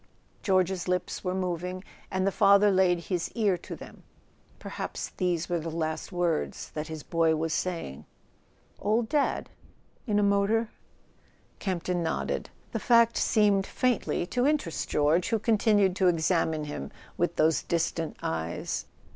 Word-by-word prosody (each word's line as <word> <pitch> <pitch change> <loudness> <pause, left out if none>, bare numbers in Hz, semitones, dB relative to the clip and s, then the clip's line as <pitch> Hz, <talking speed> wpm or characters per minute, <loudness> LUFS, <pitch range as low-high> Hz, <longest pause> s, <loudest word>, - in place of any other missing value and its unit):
George's 185 -2 +1
lips 180 0 -2
were 180 -1 -1
moving, 180 0 -3 0.3
and 190 0 0
the 195 - +2
father 200 +1 +5
laid 185 -2 +3
his 175 0 -2
ear 210 -5 +2
to - - -7
them; - - -12 0.6
perhaps - - -5
these 175 -3 0
were 175 -1 0
last 160 +1 -3
words 175 -3 -1
that 155 0 -4
his 160 -2 -7
boy 165 -1 +2
was 160 0 -1
saying. 165 - -3 0.7
"Old 220 +3 +1
Dad—in 275 -5 -3
a 210 - +3
motor?" 200 +3 +2 0.9
Campton 180 -2 -1
nodded. 165 - -2 0.2
The - - -2
fact 235 -1 +4
seemed 205 -3 +3
faintly 250 -8 0
to 245 +8 +1
interest 290 - -1
George, 155 +4 +2
who 225 - +2
continued 210 -3 +3
to 190 - +3
examine 165 -2 +1
him 145 - -5 0.3
with - - 0
those 160 0 +3
distant 165 -1 -2
eyes. 80 +1 -3
180 Hz, 140 wpm, -28 LUFS, 165-205 Hz, 0.9 s, father